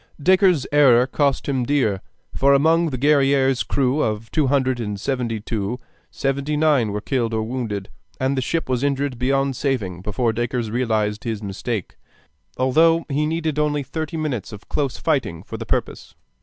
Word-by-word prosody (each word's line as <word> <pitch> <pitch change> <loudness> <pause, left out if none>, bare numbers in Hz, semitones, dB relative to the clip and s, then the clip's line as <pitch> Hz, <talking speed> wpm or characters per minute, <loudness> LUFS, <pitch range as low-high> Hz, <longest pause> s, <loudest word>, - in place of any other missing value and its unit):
Dacres's 185 -2 +4
error 130 -4 +6
cost 140 +1 0
him 135 -3 0
dear; 120 -8 +1 0.3
for 140 +1 +4
among 165 +4 +3
the 130 - -4
Guerrière's 135 -2 +3
crew 135 +2 +1
of 110 -1 -2
two 155 -4 +2
hundred 130 -2 +1
and 105 -3 -4
seventy 120 -2 -2
two, 105 +1 -3 0.3
seventy 140 +2 -2
nine 145 -8 +3
were 105 +1 -3
killed 115 -2 -1
or 110 - 0
wounded, 110 -5 -4 0.3
and 130 +1 0
the 130 - 0
ship 165 +6 -2
was 130 0 -1
injured 140 -3 -1
beyond 135 +1 +1
saving 115 -10 -2
before 110 +4 -1
Dacres 120 -1 -2
realized 110 -3 0
his 110 -3 -4
mistake, 100 +1 -4 0.6
although 165 +6 +3
he 150 +2 0
needed 160 -2 -1
only 150 -1 0
thirty 160 +3 -4
minutes 140 -11 -3
of 105 -1 -11
close 140 -4 -1
fighting 135 - -1
for - - -7
the - - -7
purpose. - - -3
130 Hz, 170 wpm, -22 LUFS, 115-145 Hz, 0.6 s, error